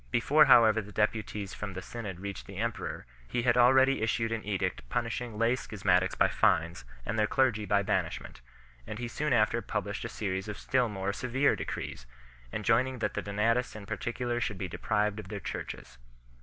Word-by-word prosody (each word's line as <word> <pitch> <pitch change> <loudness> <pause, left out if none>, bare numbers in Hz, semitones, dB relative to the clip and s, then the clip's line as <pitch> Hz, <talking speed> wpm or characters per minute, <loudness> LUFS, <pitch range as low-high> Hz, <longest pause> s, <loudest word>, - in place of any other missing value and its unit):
Before 145 +5 +5
however 110 -4 +6
the 105 0 -11
deputies 105 -2 -1
from 105 -2 -5
the 95 - -5
Synod 105 -7 -6
reached 100 -1 -6
the - - -9
emperor, - - -3 0.2
he 120 - -1
had 120 -1 +3
already 130 +1 +5
issued 115 0 0
an 115 -1 -2
edict 95 -2 -2
punishing 120 -1 -2
lay 115 +3 +3
schismatics 105 -5 +1
by - - +5
fines 85 -3 +1 0.2
and 110 +2 -2
their 105 - +3
clergy 120 -6 +2
by 100 0 +2
banishment; 95 - -2 0.5
and 110 - -5
he 120 +1 -4
soon 150 +5 -2
after 115 0 +3
published - - -3
a - - -4
series 95 -1 -3
of 105 -1 -5
still 125 +1 +1
more 100 -1 -2
severe 125 +5 +1
decrees 65 -4 -5 0.4
3, - - -3
enjoining 120 +5 +2
that 105 -3 -1
the - - -2
Donatists 115 +5 0
in 105 -2 -8
particular 120 +2 -2
should 105 -3 -2
be 95 - -3
deprived 105 +3 -1
of 105 - -8
their 100 +1 -5
churches. - - -7
110 Hz, 185 wpm, -30 LUFS, 100-120 Hz, 0.5 s, however